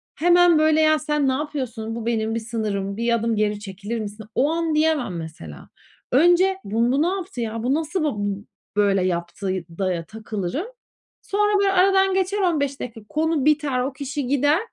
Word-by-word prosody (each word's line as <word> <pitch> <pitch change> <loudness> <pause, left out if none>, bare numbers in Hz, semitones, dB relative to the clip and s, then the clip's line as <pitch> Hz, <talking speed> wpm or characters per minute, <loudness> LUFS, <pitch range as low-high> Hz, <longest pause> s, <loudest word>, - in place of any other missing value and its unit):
Hemen, 350 -1 +5
böyle, 310 0 +4
"Ya, 310 0 +4
sen 300 -2 0
ne 260 - +2
yapıyorsun? 260 -6 -4
Bu 230 -1 -5
benim 225 -1 0
bir - - 0
sınırım, 210 -4 -3
bir 235 +1 +1
adım 230 0 0
geri 210 -1 0
çekilir 205 +3 -5
misin?" 210 0 -7
o 285 +4 +2
an 330 -1 0
diyemem 305 - +1
mesela. 120 - -9 0.4
Önce 350 +7 +4
"Bun 230 +4 +1
bu 275 +3 +2
ne 325 - +3
yaptı 360 -9 -3
ya? 225 0 -3
Bu 255 +3 +1
nasıl 320 +3 -1
ba 300 - 0
bu 205 0 -3 0.3
böyle 200 -2 +3
yaptı?" 175 +2 -3 0.3
da 185 -2 +1
ya 165 -1 -4
takılırım 220 - -4 0.5
sonra, 415 0 +1
böyle, 395 -1 +3
aradan 385 +1 +4
geçer 385 +2 0
15 290 -7 0
dakika 230 -2 -7
konu 315 -2 0
biter, 290 -4 +2
o 265 +2 -2
kişi 280 0 -4
gider, 290 +4 +3
260 Hz, 185 wpm, -23 LUFS, 215-315 Hz, 0.5 s, Hemen